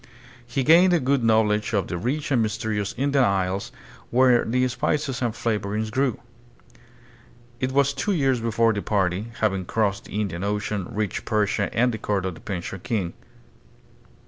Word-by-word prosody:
He 130 +3 -1
gamed 175 +6 +6
a 175 - +4
good 135 -1 +1
knowledge 110 -1 +2
of 100 -4 +1
the - - -4
rich 135 - -2
and 125 -4 +3
mysterious 110 -2 -2
Indian 140 +1 +2
Isles, 95 -2 0 0.4
where 125 -1 +4
the 125 +2 +1
spices 130 +2 -1
and 120 -2 +1
flavorings 110 -1 -2
grew. 130 -2 0 1.4
It 130 0 -1
was 140 +1 +2
two 140 +9 -1
years 135 -7 +2
before 115 0 +2
the 100 - -2
party, 95 0 0
having 95 -4 +1
crossed 100 0 -1
the 105 - -4
Indian 95 -4 -3
Ocean, 105 -2 -2
reached 105 -3 -3
Persia 105 -1 0
and 125 +2 +2
the 110 - -5
court 100 -3 -1
of 95 - -2
the - - -14
Persian 95 -1 -5
king. 95 -3 -2
110 Hz, 165 wpm, -24 LUFS, 100-130 Hz, 1.4 s, gamed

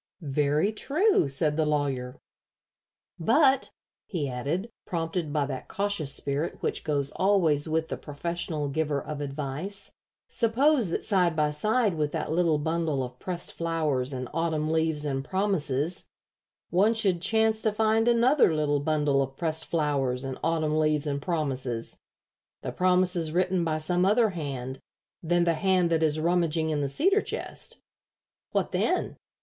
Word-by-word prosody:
"Very 150 +7 +1
true," 315 - +2
said 150 +2 0
the 160 - +2
lawyer; 135 -4 -1 1.0
"but," 265 - +3 0.4
he 160 -8 -2
added, 145 - -3 0.2
prompted 165 -2 -2
by 145 -1 +1
that 135 -2 -6
cautious 200 -8 -1
spirit 140 +4 -2
which - - -1
goes 140 -3 +1
always 170 -7 +2
with 160 +1 0
the - - -3
professional 155 0 -4
giver 145 0 -1
of 150 +1 -6
advice, 150 +8 -5 0.3
"suppose 250 - +2
that - - -2
side 180 -5 +2
by 150 -1 +1
side 215 +7 +1
with 150 -1 0
that 155 -2 -2
little 165 -2 +2
bundle 160 -2 -1
of 125 0 -8
pressed 175 -2 -4
flowers 155 -6 0
and 130 -2 -4
autumn 160 -2 0
leaves 160 -2 +1
and 135 -2 -2
promises 170 -4 -1 0.6
one 205 +6 +3
should 195 -6 +1
chance 220 +1 +2
to 220 - +2
find 220 +1 +2
another 240 - +4
little 145 -1 +1
bundle 145 -2 +1
of 135 0 -4
pressed 160 -1 -1
flowers 140 -5 0
and 135 -1 -5
autumn 155 -1 +1
leaves 155 -1 +2
and 140 -1 -2
promises 135 -8 -3 0.6
the - - -3
promises 180 -3 +2
written 180 +1 +1
by 160 -2 0
some 175 +3 0
other 215 +3 +3
hand 135 -6 -5 0.4
than 175 +1 +2
the 170 -1 +2
hand 185 0 +2
that 165 -1 +2
is 155 -1 +2
rummaging 165 -1 +1
in 150 -1 0
the 140 - -1
cedar 385 - +3
chest? - - -5 0.7
What - - 0
then? - - 0
160 Hz, 150 wpm, -27 LUFS, 145-185 Hz, 1.0 s, another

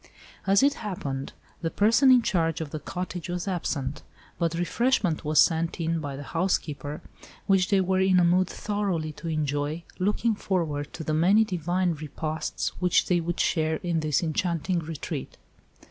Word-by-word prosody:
As 195 +5 +5
it 280 0 +5
happened, 140 -10 -4 0.3
the 165 - -1
person 230 - +4
in 250 -2 +7
charge 165 -4 +1
of 155 -3 -5
the 155 - -4
cottage 180 +3 -5
was 175 +2 -3
absent, 150 -6 -2 0.4
but 170 -1 0
refreshment 180 -1 +1
was 150 0 +2
sent 165 +1 +3
in 165 0 0
by 145 -3 -5
the 140 - -7
housekeeper, 150 -3 -2 0.4
which 190 -2 +3
they 195 -2 +4
were 185 0 +1
in 190 -1 +4
a - - +4
mood 180 +2 +3
thoroughly 195 -8 -2
to 150 +2 -9
enjoy, 150 0 -1 0.2
looking 210 +4 +1
forward 160 -8 -2
to 160 - -6
the 155 - -1
many 185 +8 +5
divine 180 -2 0
repasts 155 +1 -3
which 180 -1 +3
they 180 -1 +2
would 175 +1 -3
share 160 -1 +1
in 170 -2 0
this 155 0 +1
enchanting 170 +1 0
retreat. 160 -2 -6
170 Hz, 165 wpm, -26 LUFS, 155-185 Hz, 0.4 s, in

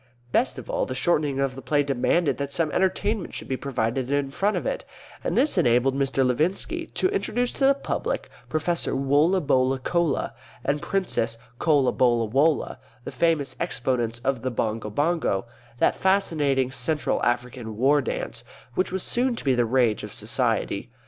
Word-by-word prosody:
Best 250 - +1
of - - -8
all, - - -1
the - - -4
shortening 150 -5 +1
of 135 -1 0
the 135 - -9
play 145 0 +1
demanded 140 +4 +1
that 140 0 -3
some 155 0 0
entertainment 190 +2 0
should - - -6
be 130 - -1
provided 130 -1 -2
in 140 -1 0
front 200 +8 0
of - - -4
it, - - -2 0.4
and - - -1
this 295 - +3
enabled 125 +2 +3
Mr. 135 -1 +1
Levinski 155 +10 -1
to - - +2
introduce 245 - -1
to 270 - +2
the 275 - +5
public 275 - -3 0.2
Professor 170 0 0
Wollabollacolla 145 +1 +2 0.3
and 145 +1 0
Princess 145 -12 -1 0.2
Collabollawolla, 130 -1 +2 0.2
the - - -6
famous 155 -6 +1
exponents 120 -2 -1
of 135 -3 0
the 130 - -1
Bongo 110 -2 -2
Bongo, 145 - 0 0.3
that - - +3
fascinating 150 -9 +1
Central 150 +2 -1
African 120 -3 -2
war 140 +5 +4
dance, 120 -2 -4 0.3
which 185 +5 0
was 190 0 -2
soon 245 0 +1
to - - -6
be 135 - +4
the 120 -1 +2
rage 120 -2 +2
of - - -7
society. - - 0
140 Hz, 160 wpm, -25 LUFS, 125-170 Hz, 0.4 s, the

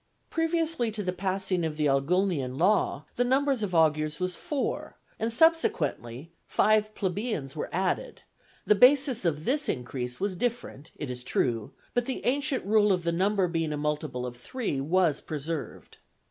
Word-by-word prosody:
Previously 325 -6 +1
to 210 -1 -3
the 180 -1 -1
passing 190 -1 0
of 155 -2 -3
the 150 - +1
Ogulnian 140 -1 +1
law 185 -4 +2
the 245 - +3
number 270 +3 +2
of 210 -9 -1
augurs 155 -2 +2
was 180 -1 0
four, 290 - -3 0.2
and - - 0
when - - 0
subsequently 165 - +1 0.2
five 215 0 +2
plebeians 190 - -3
were 150 - -4
added, 185 +1 -2 0.4
the - - +5
basis 255 0 +4
of 155 -1 -1
this 290 +4 0
increase 125 0 -4
was 195 -1 -1
different, 230 - -3
it 145 -4 -5
is 125 0 -6
true, 115 -4 -1 0.2
but 245 0 +1
the 260 - -4
ancient 275 -1 +1
rule 210 0 +4
of 180 -2 +1
the 170 - 0
number 190 +2 +2
being 165 -2 -1
a 150 - -2
multiple 150 -4 -2
of 125 -1 -6
three 145 - -3
was 165 0 +2
preserved. 155 +1 -6
185 Hz, 165 wpm, -28 LUFS, 150-230 Hz, 0.4 s, the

